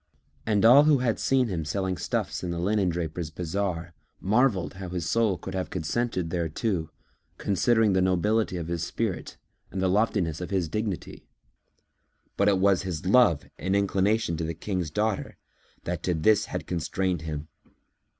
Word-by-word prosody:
And 105 -1 +3
all 135 +6 +8
who 150 -2 +5
had 120 -5 0
seen 130 -2 +2
him 90 -6 -2
selling 95 +4 -2
stuffs 80 - -3
in 90 - -3
the 85 - -3
linendrapers' 85 -4 -1
bazar 85 +1 -3 0.3
marvelled 105 -2 +2
how 95 -1 -7
his 85 -2 -3
soul 110 -2 +2
could - - -7
have 95 -1 -3
consented 90 0 -2
thereto, 85 0 -1 0.5
considering 110 +1 +2
the 95 - +3
nobility 95 +2 +1
of 85 -2 -4
his 85 -1 -2
spirit 105 +2 -3 0.3
and 95 - -5
the 95 - +2
loftiness 95 -5 +1
of 90 - -4
his 95 -4 0
dignity; 105 +2 -4 1.1
but 100 - +2
it 100 - +3
was 95 -1 +3
his 90 -3 -5
love 100 - +4
and 95 +5 0
inclination 100 -2 +1
to 85 - -3
the 80 0 -3
King's 90 -1 -3
daughter 105 +4 -2 0.5
that 85 -1 -3
to 90 -1 0
this 105 +7 +3
had - - -5
constrained 90 0 -1
him. 80 -1 -5
95 Hz, 160 wpm, -27 LUFS, 85-105 Hz, 1.1 s, all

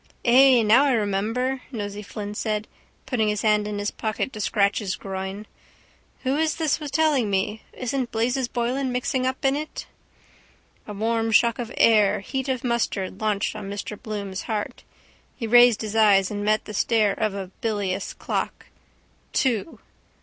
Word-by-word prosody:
—Ay, 255 0 +6
now 230 +7 +5
I 275 - +3
remember, 225 +5 -1
Nosey 205 -3 -5
Flynn 205 0 -6
said, 210 0 -2 0.4
putting 245 -5 0
his 210 -1 -1
hand 210 -1 +2
in 210 -1 -4
his 205 0 -2
pocket 220 +4 -3
to 215 - -5
scratch 200 -1 +2
his 195 -4 -3
groin. 195 +1 -6 0.8
Who 265 +2 +1
is 315 0 +1
this 315 -2 0
was 300 -2 -5
telling 285 -6 +2
me? 200 +2 -1
Isn't 255 0 -3
Blazes 245 +3 0
Boylan 250 +3 -1
mixed 250 0 -2
up 260 +2 -1
in 270 +1 +3
it? 305 +1 -5 1.0
A 210 - -6
warm 225 +2 0
shock 235 +2 +4
of 240 -1 -4
air 210 -4 +4
heat 265 +5 -4
of 255 -2 -1
mustard 220 -5 -1
hanched 210 -1 0
on 205 -2 -6
Mr 205 +1 -5
Bloom's 200 -4 -5
heart. 215 -2 -3 0.5
He 235 - -4
raised 240 0 +6
his 215 0 -5
eyes 200 -3 +4
and 205 0 -3
met 215 +1 +1
the 210 - -8
stare 215 -1 +2
of 210 -1 -1
a 190 -2 -6
bilious 200 -4 -2
clock. - - -3 0.7
Two. 255 +3 0
220 Hz, 165 wpm, -24 LUFS, 205-250 Hz, 1.0 s, Ay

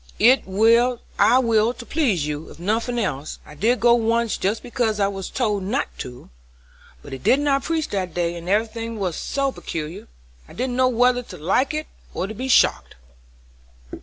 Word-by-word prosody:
"I 250 +5 +6 1.0
will 230 -1 +2
to 240 - -10
please 235 - 0
you, 150 +1 -5
if - - -13
nothing 225 +6 -1
else. 155 - -3
I - - -12
did 230 +11 +1
go 240 0 +6
once 230 -1 +1
just 205 +4 -1
because 235 -3 -1
I 200 - +3
was 195 -1 -5
told 210 -6 -1
not 225 +10 -2
to; 125 - -9 0.7
but - - -11
he 135 - -6
did 255 - +3
not 280 -1 +1
preach 320 -1 -1
that 185 -4 -3
day 175 -1 -1
and 170 +1 -7
every 210 +3 +3
thing 230 0 -6
was 185 -5 -2
so 275 -1 -1
peculiar, 160 -7 -6 0.4
I - - -14
didn't 250 +1 -2
know 255 0 +3
whether 245 0 +3
to 195 -7 -11
like 225 - +1
it 310 0 -3 0.3
or - - -1
be 230 +5 -5
shocked." 260 - +3
225 Hz, 180 wpm, -22 LUFS, 185-250 Hz, 1.0 s, I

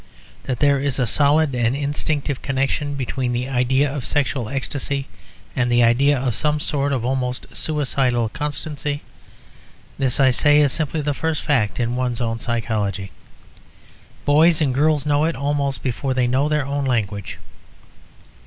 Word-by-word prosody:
That 125 -3 -3
there 140 -1 +4
is 140 -1 -1
a 125 - +1
solid 145 +3 +3
and 120 0 +1
instinctive 145 -1 -2
connection 135 +2 -1
between 130 -2 -2
the 125 +1 -2
idea 130 +2 +2
of 140 - -4
sexual 125 -4 -1
ecstasy 140 0 -3 0.5
and 125 -2 +1
the 120 0 +4
idea 135 +5 +4
of 130 -2 -1
some 150 +7 0
sort 145 -1 -1
of 125 -4 -1
almost 125 -1 -2
suicidal 135 -6 +1
constancy, 145 +1 -4 1.0
this 130 -1 +1
I 135 -1 +5
say 145 +4 +4
is 145 -2 +3
simply 155 +1 -1
the 145 0 -1
first 160 +1 -2
fact 125 -8 +1
in 120 0 0
one's 125 -2 -1
own 115 -1 -2
psychology; 105 -5 -2 1.1
boys 155 +3 +5
and 145 -5 +1
girls 150 +1 +2
know 145 0 +2
it 165 - -1
almost 140 0 -1
before 130 +1 -2
they 125 -1 +2
know 130 +4 +1
their 150 -2 +1
own 140 0 -2
language. 100 -6 -2
135 Hz, 155 wpm, -21 LUFS, 125-145 Hz, 1.1 s, I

